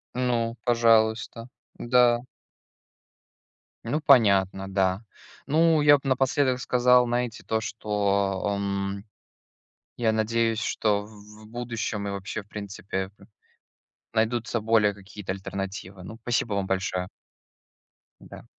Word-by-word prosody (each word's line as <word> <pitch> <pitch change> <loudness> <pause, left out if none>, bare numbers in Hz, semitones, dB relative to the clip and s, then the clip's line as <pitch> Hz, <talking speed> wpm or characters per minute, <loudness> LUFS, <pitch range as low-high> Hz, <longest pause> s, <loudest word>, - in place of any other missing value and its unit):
Ну, 120 -2 0
пожалуйста, 115 0 +2 0.3
да. 120 -1 +3 1.7
Ну, 150 +7 -1
понятно, 100 -9 +4
да. 95 +1 0 0.4
Ну, 160 +3 +3
я 145 0 +7
б - - -29
напоследок 130 0 +1
сказал, 125 0 +4
знаете, 120 -1 -2
то 110 0 -1
что, 100 -2 -1
эм, 100 0 -3 0.9
я 115 -2 +2
надеюсь, 115 +1 0
что 105 -2 0
в 105 0 -15
в - - -14
будущем 115 -3 -4
и - - -3
вообще, 100 +2 -5
в - - -31
принципе, 100 -2 -5
п - - -17 0.9
найдутся 115 +1 0
более 110 -1 +3
какие-то 100 0 -8
альтернативы. 95 -1 -6
Ну, 110 +5 -9
спасибо 120 -3 -1
вам 100 -1 -1
большое. 95 -1 -1 1.1
Да. - - -12
110 Hz, 115 wpm, -26 LUFS, 100-120 Hz, 1.7 s, я